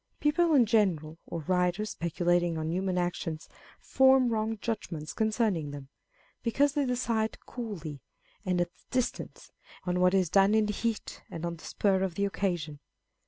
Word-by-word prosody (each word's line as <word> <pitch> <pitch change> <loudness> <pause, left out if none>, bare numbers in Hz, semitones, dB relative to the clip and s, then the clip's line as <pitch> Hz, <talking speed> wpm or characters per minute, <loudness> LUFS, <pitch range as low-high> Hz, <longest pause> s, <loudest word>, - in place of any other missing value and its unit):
People 320 +2 +3
in 250 -4 +6
general, 170 -8 +1
or 165 - -4
writers 180 +5 0
speculating 175 0 0
on 160 0 -2
human 185 +1 -1
actions, 170 -3 -2 0.3
form 265 -1 +4
wrong 220 0 -1
judgments 180 -10 -4
concerning 215 -8 0
them, 140 -2 -8 0.5
because 275 +4 +2
they 285 -2 +1
decide 235 -3 0
coolly, 170 - -6 0.4
and 180 -1 0
at 175 0 +1
a - - -31
distance, 255 -2 -3 0.3
on 180 -1 -1
what 180 +1 +4
is 185 -4 +2
done 195 +2 +5
in 215 -1 +3
heat 225 +1 -3
and 165 0 -5
on 170 0 -3
the - - -13
spur 195 -2 +1
of 190 -3 -1
the 200 - +1
occasion. 175 -7 -2
190 Hz, 160 wpm, -29 LUFS, 170-225 Hz, 0.5 s, in